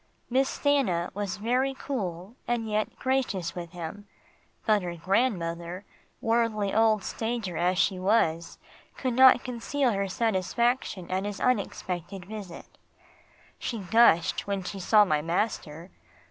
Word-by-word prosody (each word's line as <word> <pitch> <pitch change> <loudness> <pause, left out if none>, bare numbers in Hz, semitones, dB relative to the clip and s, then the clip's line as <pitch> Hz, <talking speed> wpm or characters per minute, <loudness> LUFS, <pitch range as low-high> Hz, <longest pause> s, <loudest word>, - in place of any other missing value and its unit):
Miss 265 +2 +3
Stanna 260 -13 +1
was 200 -1 -3
very 250 +5 0
cool, 195 -6 -5
and 235 -2 -1
yet 215 0 -1
gracious 250 -10 -1
with 175 -1 -6
him, 180 +4 -7 0.6
but 215 -2 +3
her 175 -1 -4
grandmother, 175 -2 -1 0.4
worldly 225 -4 +1
old 220 -2 +3
stager 225 -6 -3
as 180 +3 +1
she 185 0 +2
was, 170 -4 +1 0.4
could 255 -2 -1
not 260 0 +7
conceal 250 +2 -1
her 200 -1 -1
satisfaction 220 0 0
at 190 +1 0
his 205 0 -4
unexpected 190 -5 -2
visit. 200 -3 -9 0.8
She 235 - -3
gushed 195 -4 +3
when 200 -2 -2
she 195 +2 -6
saw 210 +3 +5
my 150 -5 +1
master. 170 -1 -2
205 Hz, 130 wpm, -27 LUFS, 180-235 Hz, 0.8 s, not